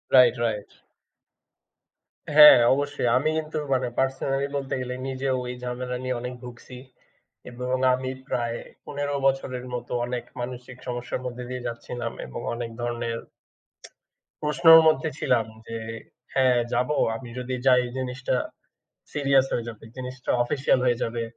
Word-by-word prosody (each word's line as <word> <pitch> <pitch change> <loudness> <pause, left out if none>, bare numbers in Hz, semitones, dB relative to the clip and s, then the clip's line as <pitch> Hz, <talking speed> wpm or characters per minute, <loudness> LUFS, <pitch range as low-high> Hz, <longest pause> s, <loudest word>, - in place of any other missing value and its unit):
Right, 125 -1 +7
right. 105 -3 -2 1.7
হ্যাঁ, 150 -4 +11 0.2
অবশ্যই। 145 -2 -1
আমি 155 +4 +1
কিন্তু 155 0 -3 0.2
মানে 130 -1 +1
পার্সোনালি 135 +1 0
বলতে 135 -1 -3
গেলে 125 0 -4
নিজেও 130 0 -1
এই 125 - -4
ঝামেলা 125 0 -3
নিয়ে 130 -1 -1
অনেক 125 0 -5
ভুগছি 125 +1 -10 0.7
এবং 125 +1 -2 0.2
আমি 130 0 -2 0.2
প্রায় 120 -1 -1 0.3
১৫ 145 0 -3
বছরের 130 -2 -1
মতো 120 0 -6
অনেক 125 -1 -3 0.2
মানসিক 125 0 -7
সমস্যার 120 +1 -3
মধ্যে 125 0 -5
দিয়ে 125 -1 -5
যাচ্ছিলাম 120 0 -5
এবং - - -7 0.2
অনেক 120 -1 -4
ধরনের 120 -1 -2 1.2
প্রশ্নর 165 +2 +7
মধ্যে 155 0 +3
ছিলাম। 115 -3 +2 0.2
যে 115 - -4 0.6
হ্যাঁ 130 -2 +4 0.2
যাবো 125 +5 +1 0.2
আমি 120 0 -8
যদি 125 +1 -3
যাই 125 -1 +6
জিনিসটা 130 0 -2 0.8
সিরিয়াস 135 -2 +3
হয়ে 120 0 -1
যাবে। 110 -1 -9
জিনিসটা 130 0 -5
official 135 +2 +1
হয়ে 120 -1 +2
যাবে। 115 0 -2
125 Hz, 135 wpm, -25 LUFS, 120-135 Hz, 1.7 s, হ্যাঁ